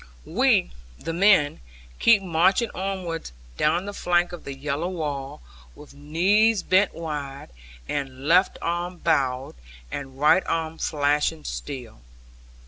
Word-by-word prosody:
We, -, -, +2 dB, 0.3 s
the 165 Hz, -, -5 dB
men, 180 Hz, -5 st, +4 dB, 0.4 s
kept 215 Hz, -4 st, +5 dB
marching 185 Hz, +6 st, +2 dB
onwards 185 Hz, -, -4 dB, 0.2 s
down 170 Hz, -, +1 dB
the 205 Hz, -, -5 dB
flank 175 Hz, -2 st, +1 dB
of 175 Hz, -, -9 dB
the 140 Hz, -, -6 dB
yellow 150 Hz, +4 st, -2 dB
wall, 150 Hz, -5 st, -4 dB, 0.3 s
with 150 Hz, -1 st, -14 dB
knees 190 Hz, +9 st, +2 dB
bent 190 Hz, +2 st, +3 dB
wide, 145 Hz, -4 st, -6 dB, 0.4 s
and 135 Hz, -2 st, -4 dB
left 180 Hz, +4 st, +4 dB
arm 175 Hz, +1 st, -2 dB
bowed 130 Hz, -4 st, 0 dB, 0.4 s
and 135 Hz, -2 st, -7 dB
right 150 Hz, +5 st, +5 dB
arm 160 Hz, 0 st, -2 dB
flashing 150 Hz, +1 st, 0 dB
steel. 125 Hz, -, -7 dB
160 Hz, 125 wpm, -24 LUFS, 145-180 Hz, 0.4 s, kept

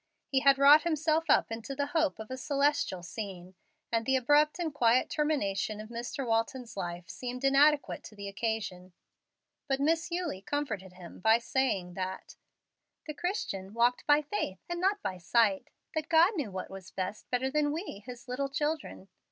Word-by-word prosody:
He 270 Hz, -, +3 dB
had 275 Hz, 0 st, +5 dB
wrought 285 Hz, +2 st, +8 dB
himself 320 Hz, -1 st, +1 dB
up -, -, +4 dB
into 230 Hz, +5 st, -5 dB
the 285 Hz, +1 st, 0 dB
hope 320 Hz, -3 st, +2 dB
of 220 Hz, +2 st, -9 dB
a -, -, -2 dB
celestial 280 Hz, -, 0 dB
scene, 185 Hz, -2 st, -7 dB, 0.4 s
and 230 Hz, -1 st, +1 dB
the 265 Hz, +3 st, +2 dB
abrupt 295 Hz, +4 st, +3 dB
and 330 Hz, -4 st, -2 dB
quiet 245 Hz, -2 st, +3 dB
termination 220 Hz, -9 st, 0 dB
of 215 Hz, +1 st, -8 dB
Mr. 245 Hz, +4 st, -4 dB
Walton's 230 Hz, +2 st, -1 dB
life 175 Hz, -2 st, -5 dB
seemed 250 Hz, +6 st, -6 dB
inadequate 280 Hz, +2 st, +3 dB
to 215 Hz, -, -11 dB
the 200 Hz, -1 st, -7 dB
occasion. 200 Hz, -4 st, -3 dB, 0.7 s
But 270 Hz, -1 st, 0 dB
Miss 325 Hz, +4 st, +1 dB
Eulie 340 Hz, -, -3 dB
comforted 215 Hz, -8 st, -3 dB
him 180 Hz, -2 st, -12 dB
by 220 Hz, +4 st, +5 dB
saying 235 Hz, -7 st, -1 dB
that 185 Hz, +1 st, -5 dB, 0.7 s
"the 305 Hz, -, -5 dB
Christian 230 Hz, -, -3 dB
walked 240 Hz, +1 st, +2 dB
by 295 Hz, +1 st, +5 dB
faith, 210 Hz, -8 st, -3 dB
and 345 Hz, 0 st, -3 dB
not 395 Hz, +2 st, +2 dB
by 185 Hz, -1 st, -3 dB
sight 200 Hz, +1 st, +2 dB, 0.3 s
that 315 Hz, 0 st, -3 dB
God 340 Hz, +5 st, +5 dB
knew 290 Hz, -, -2 dB
what 190 Hz, -1 st, -6 dB
was 190 Hz, -2 st, -9 dB
best, 190 Hz, +2 st, -5 dB
better 260 Hz, +1 st, 0 dB
than 295 Hz, 0 st, +1 dB
we, 320 Hz, -, -5 dB
His 245 Hz, +3 st, -10 dB
little 270 Hz, +3 st, -2 dB
children. 295 Hz, -7 st, -3 dB
255 Hz, 175 wpm, -30 LUFS, 200-295 Hz, 0.7 s, wrought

